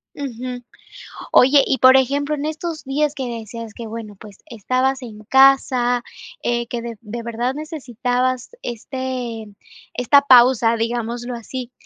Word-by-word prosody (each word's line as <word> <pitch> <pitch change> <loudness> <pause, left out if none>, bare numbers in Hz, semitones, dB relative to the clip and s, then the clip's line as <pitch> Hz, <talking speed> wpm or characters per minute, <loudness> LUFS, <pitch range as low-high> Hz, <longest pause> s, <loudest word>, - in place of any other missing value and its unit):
Ujú. 250 -2 -6 0.7
Oye, 275 +2 +6
y 265 - 0
por 260 +1 +7
ejemplo, 285 +3 0
en 290 0 -4
estos 315 +1 -4
días 290 +2 -1
que 265 - -4
decías 230 -1 -7
que, 230 0 -8
bueno, 220 -2 -8
pues, 205 -3 -13
estabas 255 +4 -1
en 215 -4 -10
casa, 255 -1 +4 0.4
eh, 240 0 -1
que 235 0 -4
de 235 -2 -6
de 230 +1 -7
verdad 235 +3 -2
necesitabas 255 -4 -2
este 245 -1 -5 0.5
esta 250 +3 +4
pausa, 245 -3 +5
digámoslo 235 +1 -3
así, 245 +1 -7
245 Hz, 135 wpm, -20 LUFS, 235-265 Hz, 0.7 s, por